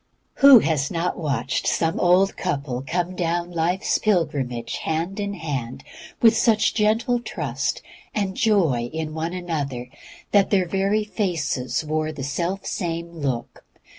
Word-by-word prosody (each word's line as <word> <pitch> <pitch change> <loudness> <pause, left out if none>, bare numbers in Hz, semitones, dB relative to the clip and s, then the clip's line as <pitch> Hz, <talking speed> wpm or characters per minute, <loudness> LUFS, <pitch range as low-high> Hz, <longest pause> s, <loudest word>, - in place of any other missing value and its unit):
Who 275 -2 +10
has 150 -9 +1
not 170 +1 -1
watched 140 -8 -1
some 165 0 +1
old 185 +2 +4
couple 140 -7 -3
come 180 +1 -1
down 175 0 -1
life's 175 +3 0
pilgrimage 145 - -1
hand 165 +5 -2
in 200 0 -3
hand, 140 -9 -4 0.4
with 225 -1 +7
such 220 -1 +3
gentle 225 +3 +2
trust 240 - -3 0.3
and 195 -3 -1
joy 165 - +2
in 160 -1 -4
one 160 +2 -3
another 145 -9 -4 0.4
that 200 -2 +4
their 190 -3 +2
very 195 +4 +1
faces 160 - -2
wore 155 0 -1
the 150 -3 -7
self 170 +8 -2
same 170 -2 -3
look? 135 -8 -4
170 Hz, 135 wpm, -23 LUFS, 150-195 Hz, 0.4 s, Who